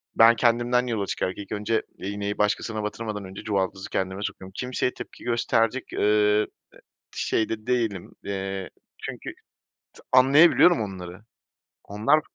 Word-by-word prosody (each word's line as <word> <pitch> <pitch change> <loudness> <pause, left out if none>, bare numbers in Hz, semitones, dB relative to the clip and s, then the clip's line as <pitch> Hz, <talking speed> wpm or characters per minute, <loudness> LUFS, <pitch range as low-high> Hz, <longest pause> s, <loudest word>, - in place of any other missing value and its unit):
ben 115 +1 +7
kendimden 120 +2 +2
yola 110 -4 -1
çıkarak 95 -1 -2
ilk 100 -1 -9
önce 105 +1 0
iğneyi 100 +1 -4
başkasına 110 +1 0
batırmadan 105 -1 -4
önce 95 +1 -9
çuvaldızı 95 -2 -2
kendime 95 +1 -2
sokuyorum. 95 -2 -6
Kimseye 125 0 -1
tepki - - -10
gösterecek, 120 +1 0
eee, 105 0 +3 0.7
şeyde 110 0 -1
değilim, 115 -7 -1
eee, 95 -1 -4 0.3
çünkü - - -7 0.6
t - - -16
anlayabiliyorum 140 +4 +6
onları. 95 -2 -6 0.6
Onlar 115 +10 +2
105 Hz, 120 wpm, -25 LUFS, 100-120 Hz, 0.7 s, ben